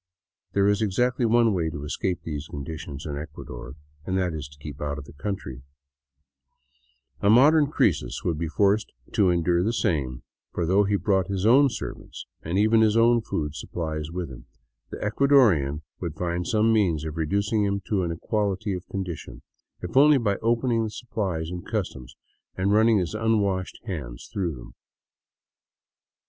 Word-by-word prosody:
There 100 Hz, 0 st, +3 dB
is 105 Hz, +1 st, +2 dB
exactly 120 Hz, +4 st, +1 dB
one 115 Hz, -1 st, +4 dB
way 85 Hz, -4 st, 0 dB
to 75 Hz, -2 st, -6 dB
escape 90 Hz, +5 st, -2 dB
these 75 Hz, -3 st, -5 dB
conditions 75 Hz, 0 st, -7 dB
in 70 Hz, -2 st, -4 dB
Ecuador, 65 Hz, -4 st, -8 dB, 0.3 s
and 95 Hz, +3 st, -1 dB
that 90 Hz, -3 st, 0 dB
is 75 Hz, -3 st, -5 dB
to 70 Hz, +1 st, -17 dB
keep 70 Hz, -1 st, -9 dB
out 75 Hz, 0 st, -2 dB
of 70 Hz, -, -8 dB
the 70 Hz, -, -13 dB
countr3\ 80 Hz, -7 st, -5 dB, 1.6 s
A 100 Hz, -, +2 dB
modern 145 Hz, +6 st, +6 dB
Croesus 145 Hz, -, 0 dB
would 80 Hz, -3 st, -1 dB
be 85 Hz, -, -1 dB
forced 100 Hz, +5 st, +1 dB, 0.2 s
to 100 Hz, -4 st, +4 dB
endure 85 Hz, 0 st, +2 dB
the 105 Hz, +5 st, +1 dB
same, 65 Hz, -, -1 dB, 0.3 s
for 85 Hz, -, -1 dB
though 95 Hz, +4 st, +3 dB
he 100 Hz, +1 st, +1 dB
brought 95 Hz, -2 st, +1 dB
his 100 Hz, 0 st, -2 dB
own 135 Hz, +5 st, +6 dB
servants 120 Hz, -, -7 dB, 0.2 s
and 85 Hz, +4 st, -2 dB
even 110 Hz, +2 st, +4 dB
his 110 Hz, -1 st, +4 dB
food 115 Hz, -10 st, +2 dB
supplies 80 Hz, -1 st, -4 dB
with 85 Hz, -4 st, -5 dB
him, -, -, -12 dB, 0.4 s
the -, -, -6 dB
Eucadorian 105 Hz, -, +3 dB, 0.2 s
would 85 Hz, -4 st, -4 dB
find 85 Hz, +1 st, -2 dB
some 110 Hz, +1 st, +3 dB
means 85 Hz, -8 st, +2 dB
of 80 Hz, -1 st, -5 dB
reducing 100 Hz, +7 st, 0 dB
him 100 Hz, 0 st, 0 dB
to 95 Hz, +1 st, -1 dB
an 85 Hz, -2 st, -1 dB
equality 100 Hz, +3 st, -1 dB
of 90 Hz, -1 st, -6 dB
condition, 95 Hz, -4 st, -6 dB, 0.4 s
if 90 Hz, -, -6 dB
only 145 Hz, +2 st, +7 dB
by 105 Hz, -6 st, 0 dB
opening 115 Hz, 0 st, +1 dB
the 110 Hz, -, -2 dB
supplies 100 Hz, -7 st, -3 dB
in 90 Hz, -1 st, -5 dB
customs 90 Hz, -, -4 dB, 0.4 s
and 95 Hz, +2 st, +1 dB
running 110 Hz, +1 st, +5 dB
his 90 Hz, -1 st, -1 dB
unwashed 105 Hz, -4 st, 0 dB
hands 75 Hz, -, -6 dB
through 90 Hz, -6 st, -1 dB
them. -, -, -12 dB
95 Hz, 165 wpm, -25 LUFS, 80-110 Hz, 1.6 s, only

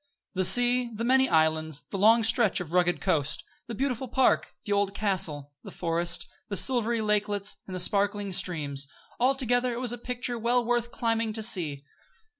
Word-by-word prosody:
The 190 Hz, -1 st, 0 dB
sea; 245 Hz, +4 st, +4 dB
the 225 Hz, -, -4 dB
many 265 Hz, +2 st, +3 dB
islands; 160 Hz, -2 st, +1 dB
the 195 Hz, -, -3 dB
long 225 Hz, +3 st, +5 dB
stretch 220 Hz, -2 st, +2 dB
of 175 Hz, -2 st, -7 dB
rugged 175 Hz, -1 st, +1 dB
coast; 155 Hz, -5 st, -1 dB, 0.2 s
the 235 Hz, -, -6 dB
beautiful 260 Hz, 0 st, -2 dB
park; 260 Hz, +2 st, +1 dB
the 205 Hz, -, -5 dB
old 200 Hz, -1 st, 0 dB
castle; 155 Hz, -9 st, 0 dB
the -, -, -9 dB
forest; 170 Hz, 0 st, -1 dB, 0.2 s
the 200 Hz, -, -1 dB
silvery 235 Hz, -2 st, +2 dB
lakelets, 205 Hz, -1 st, -1 dB
and 185 Hz, -, -6 dB
the -, -, -3 dB
sparkling 200 Hz, +1 st, 0 dB
streams 145 Hz, -7 st, -2 dB, 0.3 s
altogether, 250 Hz, -1 st, +2 dB
it 235 Hz, -, -5 dB
was 245 Hz, -2 st, 0 dB
a 240 Hz, -, -7 dB
picture 245 Hz, 0 st, -3 dB
well 240 Hz, +1 st, +1 dB
worth 240 Hz, 0 st, 0 dB
climbing 230 Hz, -2 st, -1 dB
to 220 Hz, 0 st, -4 dB
see. 160 Hz, -10 st, -1 dB
210 Hz, 175 wpm, -27 LUFS, 175-240 Hz, 0.3 s, long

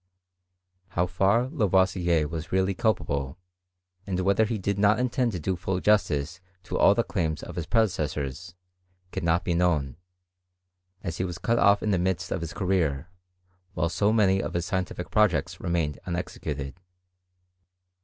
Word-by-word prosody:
How 85 Hz, -, +4 dB
far 95 Hz, +7 st, +2 dB
Lavoisier 95 Hz, -, +2 dB
was 80 Hz, +1 st, -6 dB
really 95 Hz, +1 st, +2 dB
culpable, 70 Hz, -, -1 dB, 0.7 s
and 95 Hz, -2 st, -1 dB
whether 100 Hz, +3 st, +3 dB
he 110 Hz, +1 st, -2 dB
did 100 Hz, 0 st, -2 dB
not 105 Hz, +1 st, +4 dB
intend 125 Hz, -1 st, +1 dB
to 90 Hz, -, -3 dB
do 95 Hz, +4 st, -1 dB
full 90 Hz, +1 st, -2 dB
justice 90 Hz, -5 st, +1 dB, 0.2 s
to 85 Hz, -, -5 dB
all 100 Hz, -, +6 dB
the 115 Hz, -, +2 dB
claims 80 Hz, -9 st, -2 dB
of -, -, -8 dB
his 85 Hz, -2 st, -4 dB
predecessors, 85 Hz, -, -1 dB, 0.6 s
cannot 85 Hz, +1 st, +1 dB
now -, -, -21 dB
be 85 Hz, -, 0 dB
known; 80 Hz, -6 st, +1 dB, 1.1 s
as 85 Hz, -5 st, -4 dB
he -, -, -1 dB
was 90 Hz, -2 st, -4 dB
cut 115 Hz, +5 st, +1 dB
off 100 Hz, 0 st, +4 dB
in 105 Hz, -, +1 dB
the 95 Hz, -, +2 dB
midst 90 Hz, -1 st, -1 dB
of 90 Hz, -, -1 dB
his 85 Hz, -1 st, -4 dB
career, 90 Hz, -6 st, 0 dB, 0.7 s
while 85 Hz, -, 0 dB
so 100 Hz, +4 st, +1 dB
many 95 Hz, -3 st, +3 dB
of -, -, -5 dB
his 85 Hz, 0 st, 0 dB
scientific 90 Hz, -1 st, -3 dB
projects 105 Hz, -5 st, +2 dB
re -, -, -3 dB
mained 80 Hz, -4 st, -1 dB
unexecuted. 75 Hz, -5 st, -4 dB
90 Hz, 160 wpm, -26 LUFS, 85-100 Hz, 1.1 s, all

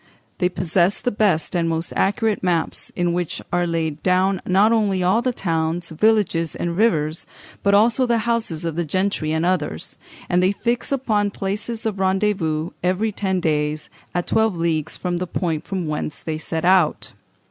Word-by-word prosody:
They 180 Hz, -, +2 dB
possess 180 Hz, +2 st, +1 dB
the 245 Hz, -, -1 dB
best 195 Hz, -6 st, +1 dB
and 170 Hz, -1 st, +1 dB
most 165 Hz, +1 st, -2 dB
accurate 215 Hz, +1 st, +1 dB
maps, 175 Hz, -3 st, -1 dB
in 175 Hz, -1 st, 0 dB
which 175 Hz, -2 st, -2 dB
are 175 Hz, 0 st, +2 dB
laid 160 Hz, -2 st, -2 dB
down 185 Hz, +1 st, +2 dB
not 195 Hz, +4 st, +4 dB
only 205 Hz, -5 st, +2 dB
all 190 Hz, +6 st, +3 dB
the 255 Hz, 0 st, 0 dB
towns, 165 Hz, -4 st, -1 dB
villages, 175 Hz, -3 st, +2 dB
and 170 Hz, -1 st, -2 dB
rivers, 160 Hz, -7 st, +1 dB, 0.3 s
but 200 Hz, 0 st, +3 dB
also 235 Hz, +5 st, +4 dB
the 235 Hz, -1 st, +2 dB
houses 225 Hz, -9 st, -1 dB
of 165 Hz, -2 st, -2 dB
the 170 Hz, -, 0 dB
gentry 185 Hz, -1 st, -1 dB
and 160 Hz, +1 st, 0 dB
others; 155 Hz, -, -2 dB, 0.3 s
and 180 Hz, 0 st, +2 dB
they 185 Hz, +2 st, +3 dB
fix 235 Hz, +5 st, -1 dB
upon 220 Hz, -7 st, +1 dB
places 205 Hz, +4 st, -3 dB
of 210 Hz, -3 st, -2 dB
rendezvous 190 Hz, -5 st, 0 dB
every 185 Hz, +5 st, +1 dB
ten 190 Hz, -2 st, -1 dB
days, 150 Hz, -2 st, -1 dB, 0.2 s
at 175 Hz, -, 0 dB
twenty 220 Hz, -4 st, +1 dB
leagues 165 Hz, -3 st, -1 dB
from 175 Hz, -1 st, -2 dB
the 180 Hz, +1 st, -3 dB
point 165 Hz, -4 st, -2 dB
from 190 Hz, -3 st, -2 dB
whence 150 Hz, -1 st, -3 dB
they 155 Hz, -1 st, -4 dB
set 160 Hz, +1 st, -3 dB
out.... 180 Hz, -4 st, +3 dB
180 Hz, 175 wpm, -21 LUFS, 165-205 Hz, 0.3 s, not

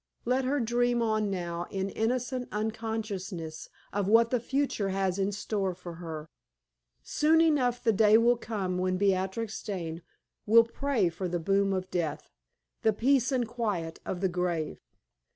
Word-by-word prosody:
let 255 Hz, +2 st, +1 dB
her 285 Hz, +3 st, +1 dB
dream 240 Hz, 0 st, +1 dB
on 215 Hz, -2 st, +1 dB
now 175 Hz, -2 st, -3 dB
in 195 Hz, 0 st, -3 dB
innocent 250 Hz, +2 st, -1 dB
unconsciousness 210 Hz, -6 st, -4 dB, 0.2 s
of 200 Hz, -1 st, 0 dB
what 230 Hz, +2 st, +5 dB
the 250 Hz, -, +2 dB
future 255 Hz, -5 st, -1 dB
has 190 Hz, 0 st, 0 dB
in 195 Hz, +1 st, +1 dB
store 195 Hz, -2 st, -2 dB
for 175 Hz, -1 st, -8 dB
her. 160 Hz, -2 st, -6 dB, 0.8 s
Soon 315 Hz, +2 st, +3 dB
enough 270 Hz, -7 st, +2 dB
the 225 Hz, -2 st, +3 dB
day 215 Hz, +1 st, +6 dB
will 235 Hz, +1 st, +4 dB
come 200 Hz, -6 st, -3 dB
when 185 Hz, 0 st, 0 dB
Beatrix 195 Hz, +3 st, 0 dB
Dane 170 Hz, -5 st, -4 dB, 0.5 s
will 230 Hz, +2 st, +8 dB
pray 230 Hz, -4 st, 0 dB
for 180 Hz, +3 st, -4 dB
the 175 Hz, 0 st, -2 dB
boon 195 Hz, +3 st, +2 dB
of 185 Hz, -1 st, -2 dB
death, 160 Hz, -4 st, -3 dB, 0.5 s
the 220 Hz, -, +3 dB
peace 255 Hz, +4 st, +2 dB
and 250 Hz, -3 st, +1 dB
quiet 210 Hz, -9 st, -3 dB
of 180 Hz, -, -4 dB
the 190 Hz, -, +3 dB
grave! 175 Hz, -3 st, -2 dB
205 Hz, 155 wpm, -29 LUFS, 185-235 Hz, 0.8 s, will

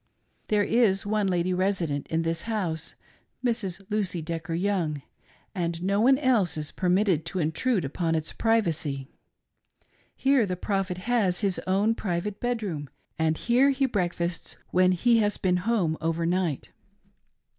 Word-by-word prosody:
There 210 Hz, -1 st, +2 dB
is 205 Hz, -4 st, +2 dB
one 210 Hz, -1 st, +1 dB
lady 180 Hz, 0 st, +1 dB
resident 180 Hz, -6 st, -1 dB
in 165 Hz, +1 st, 0 dB
this 165 Hz, 0 st, -1 dB
house 170 Hz, -8 st, -2 dB, 0.2 s
— -, -, -15 dB
Mrs. 205 Hz, -6 st, -1 dB
Lucy 200 Hz, -4 st, 0 dB
Decker 165 Hz, +1 st, -4 dB
Young 170 Hz, -6 st, -1 dB, 0.2 s
— -, -, -33 dB
and 170 Hz, -3 st, -2 dB
no 200 Hz, +2 st, +1 dB
one 265 Hz, +3 st, +5 dB
else 245 Hz, -, +2 dB
is 150 Hz, -1 st, -4 dB
per 180 Hz, -, -1 dB
mitted 185 Hz, -4 st, +2 dB
to 190 Hz, -, -4 dB
intrude 175 Hz, -, 0 dB
upon 165 Hz, +4 st, -1 dB
its 160 Hz, 0 st, -2 dB
privacy. 165 Hz, -, 0 dB, 1.1 s
Here 270 Hz, -5 st, +3 dB
the 180 Hz, -, -2 dB
prophet 195 Hz, -1 st, -2 dB
has 200 Hz, -3 st, +1 dB
bis 195 Hz, -2 st, +1 dB
own 200 Hz, +4 st, +2 dB
private 195 Hz, -1 st, -3 dB
bedroom, 205 Hz, -, -3 dB, 0.3 s
and 160 Hz, 0 st, +1 dB
here 250 Hz, +4 st, +3 dB
he 270 Hz, 0 st, +2 dB
breakfasts 175 Hz, -6 st, -2 dB
when 185 Hz, 0 st, +4 dB
he 230 Hz, +6 st, +3 dB
has 210 Hz, -1 st, +1 dB
been 180 Hz, -1 st, +1 dB
at -, -, -7 dB
home 200 Hz, -9 st, +1 dB
over 165 Hz, 0 st, 0 dB
night. 175 Hz, -4 st, -1 dB
185 Hz, 155 wpm, -26 LUFS, 165-215 Hz, 1.1 s, one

